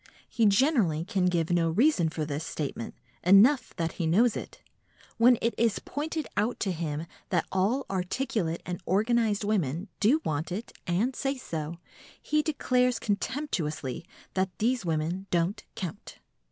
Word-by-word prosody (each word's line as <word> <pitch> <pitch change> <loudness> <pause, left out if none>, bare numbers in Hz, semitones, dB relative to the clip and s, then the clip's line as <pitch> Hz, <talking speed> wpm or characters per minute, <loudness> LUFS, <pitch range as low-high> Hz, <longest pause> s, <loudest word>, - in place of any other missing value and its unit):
He 225 -2 +2
generally 200 - +3
can 190 -3 +1
give 170 -2 +1
no 170 -1 +3
reason 195 - +3
for 155 -1 -3
this 150 +1 -3
statement; 140 -8 -4 0.3
enough 210 +10 +5
that 165 -1 -1
he 170 - -2
knows 215 +8 +4
it. - - -7 0.6
When 240 +1 +6
it 230 - +2
is 230 -2 +2
pointed 310 +1 -4
out 215 +4 0
to 195 - +1
him 160 -2 -3 0.2
that 175 -3 +1
all 210 +9 +1
articulate 185 -2 -2
and 180 0 -4
organised 215 +1 +2
women 185 -3 -1
do 245 +9 +4
want 155 +3 -2
it 210 +6 -4 0.2
and 210 +9 +1
say 275 +2 -1
so, 165 -8 -5 0.4
he 305 0 +1
declares 250 -5 +1
contemptuously 170 - -2 0.3
that 190 0 +1
these 245 +2 +1
women 170 +3 -2
don't 175 +3 0
count. 190 -2 -6
195 Hz, 150 wpm, -28 LUFS, 165-235 Hz, 0.6 s, When